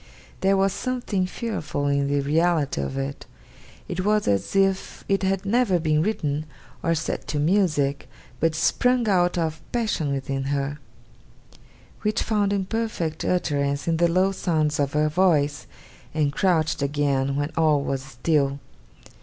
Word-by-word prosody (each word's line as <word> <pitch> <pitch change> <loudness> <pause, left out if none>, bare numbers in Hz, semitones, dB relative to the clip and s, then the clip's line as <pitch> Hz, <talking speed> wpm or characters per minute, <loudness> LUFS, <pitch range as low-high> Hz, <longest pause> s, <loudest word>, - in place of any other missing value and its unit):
There 195 +1 +3
was 195 -1 +2
something 240 -7 -2
fearful 185 -10 -3
in 140 0 +1
the 145 0 +1
reality 155 - +1
of 70 -1 -4
it. 70 +1 -4 0.6
It 185 - -3
was 210 +1 +2
as 100 - 0
if 195 -1 +1
it 195 0 +1
had 195 0 0
never 215 -3 +2
been 155 -2 +1
written, 155 -6 -1 0.3
or 165 0 +1
set 155 - -3
to 150 - -2
music, 155 -4 +1 0.3
but 165 -1 +1
sprung 250 +7 +2
out 180 -3 +2
of 160 -2 -2
passion 215 -11 0
within 135 0 -2
her; 140 +1 -2 1.2
which 210 0 0
found 205 -2 +1
imperfect 195 -5 -2
utterance 140 -5 0
in 165 -1 +2
the 170 +1 +4
low 185 +3 +2
sounds 155 -6 0
of 140 -1 0
her 150 0 +2
voice, 150 -3 +2 0.5
and 145 -2 +1
crouched 160 -4 +1
again 140 -1 0
when 145 +2 -1
all 155 -3 +3
was 135 -1 -2
still. 140 +2 0
160 Hz, 145 wpm, -24 LUFS, 140-190 Hz, 1.2 s, the